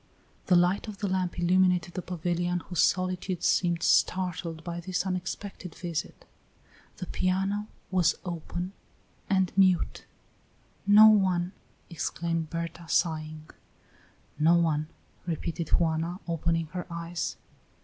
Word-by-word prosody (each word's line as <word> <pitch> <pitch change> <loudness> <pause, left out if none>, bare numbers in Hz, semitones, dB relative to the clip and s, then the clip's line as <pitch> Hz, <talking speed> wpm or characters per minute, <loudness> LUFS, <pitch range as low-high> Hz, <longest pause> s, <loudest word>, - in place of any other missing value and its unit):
The 180 - +5
light 180 +5 +3
of 210 -2 -7
the 205 - -2
lamp 185 -2 -1
illumined 180 +1 +4
the 185 - -3
pavilion, 175 0 -1
whose 180 0 -1
solitude 185 0 0
seemed 170 -2 +2
startled 175 -3 +1
by 170 0 -4
this 180 +2 -2
unexpected 185 -1 -5
visit; 170 -4 -5 0.7
the 185 - -5
piano 195 +4 -1 0.2
was 180 -3 +3
open 175 +2 -4 0.6
and 190 -2 +2
mute. 185 -3 +3 0.8
"No 210 +2 +9
one!" 185 -4 +3 0.4
exclaimed 165 0 -2
Berta, 170 0 -5
sighing. 155 -2 -1 0.9
"No 160 +3 +5
one," 155 -3 +1 0.4
repeated 170 0 -3
Juana, 165 +2 +1
opening 165 0 0
her 180 -1 -5
eyes. 170 0 -4
175 Hz, 115 wpm, -28 LUFS, 165-185 Hz, 0.9 s, No